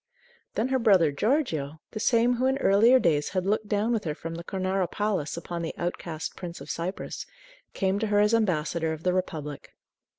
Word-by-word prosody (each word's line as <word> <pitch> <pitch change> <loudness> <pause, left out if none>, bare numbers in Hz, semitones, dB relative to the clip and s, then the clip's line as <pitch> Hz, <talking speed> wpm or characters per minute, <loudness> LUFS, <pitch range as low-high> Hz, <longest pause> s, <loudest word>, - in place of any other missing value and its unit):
Then 235 +4 0
her 260 0 +2
brother 190 -10 +5
Giorgio, 160 - 0
the 215 - -5
same 235 +2 +3
who 255 +2 +2
in 265 +1 +2
earlier 230 +1 +5
days 155 -10 +2
had 185 - 0
looked 210 +2 0
down 210 +3 +1
with 225 - 0
her 150 -2 -2
from 165 +1 -6
the 170 +1 -6
Cornaro 185 0 -1
Palace 200 -8 -1
upon 170 0 -5
the 165 - -4
outcast 170 -2 -4
Prince 175 -1 -7
of 140 +1 -6
Cyprus, 170 +5 -4 0.5
came 195 0 +1
to 220 - 0
her 205 0 +3
as 210 +2 +3
ambassador 170 -6 +1
of 160 +1 -8
the 180 - +2
Republic. 155 -6 -4
185 Hz, 195 wpm, -27 LUFS, 165-215 Hz, 0.5 s, brother